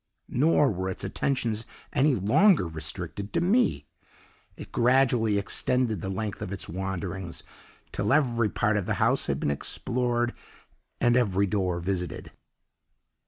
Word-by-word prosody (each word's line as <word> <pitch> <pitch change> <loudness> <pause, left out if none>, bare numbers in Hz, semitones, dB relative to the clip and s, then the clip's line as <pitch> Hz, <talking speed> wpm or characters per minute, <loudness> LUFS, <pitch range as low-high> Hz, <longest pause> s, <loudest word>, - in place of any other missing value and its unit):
"Nor 145 0 +3
were 95 -1 -3
its 95 - -5
attentions 115 +1 -1 0.3
any 140 0 +3
longer 110 - +4
restricted 85 +5 -5
to 170 - +2
me; 215 +8 +2 0.7
it - - -10
gradually 120 -3 +3
extended 110 0 0
the 95 - -4
length 100 +1 -4
of 90 - -5
its 100 - -5
wanderings 95 -1 -5 0.5
till 100 +1 -1
every 120 -7 +2
part 105 +1 +1
of 100 - -2
the - - 0
house - - +2
had 70 0 -1
been 70 - 0
explored 120 - -1 0.7
and 120 0 +3
every 100 -5 +2
door 95 -3 -1
visited. 90 -1 -4
105 Hz, 135 wpm, -27 LUFS, 95-125 Hz, 0.7 s, longer